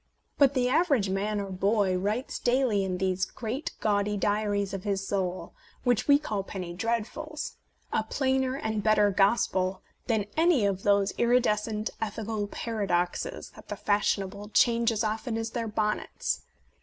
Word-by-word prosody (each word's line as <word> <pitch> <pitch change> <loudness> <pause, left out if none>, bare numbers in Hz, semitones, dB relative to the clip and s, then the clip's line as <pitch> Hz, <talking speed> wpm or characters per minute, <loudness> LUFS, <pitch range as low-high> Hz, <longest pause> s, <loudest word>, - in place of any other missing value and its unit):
But 280 -1 +5
the 250 -1 +2
average 275 - +2
man 205 +2 -1
or 200 -1 -4
boy 195 0 +2
writes 210 +7 -2
daily 240 -5 +2
in 185 -1 -2
these 185 0 0
great 255 - -4
gaudy 205 0 +1
diaries 205 -1 0
of 195 -1 -4
his 195 -2 -1
soul, 185 -2 -2 0.3
which 245 -3 +2
we 285 -1 +7
call 215 -9 -3
Penny 185 -3 -6
Dreadfuls, 235 - -3 0.4
a - - +2
plainer 265 -1 0
and 220 -5 -2
better 210 -1 +4
gospel 195 -2 +2 0.2
than 220 -4 +1
any 320 -8 +4
of 195 -1 0
those 200 -1 +3
iridescent 220 -3 +1
ethical 215 -1 -2
paradoxes 195 -6 -2
that - - -15
the - - -4
fashionable 205 0 0
change 235 -1 +4
as 220 0 -1
often 220 +1 -2
as 225 0 -3
their 230 -1 -2
bonnets. 210 0 -1
210 Hz, 150 wpm, -28 LUFS, 195-235 Hz, 0.4 s, we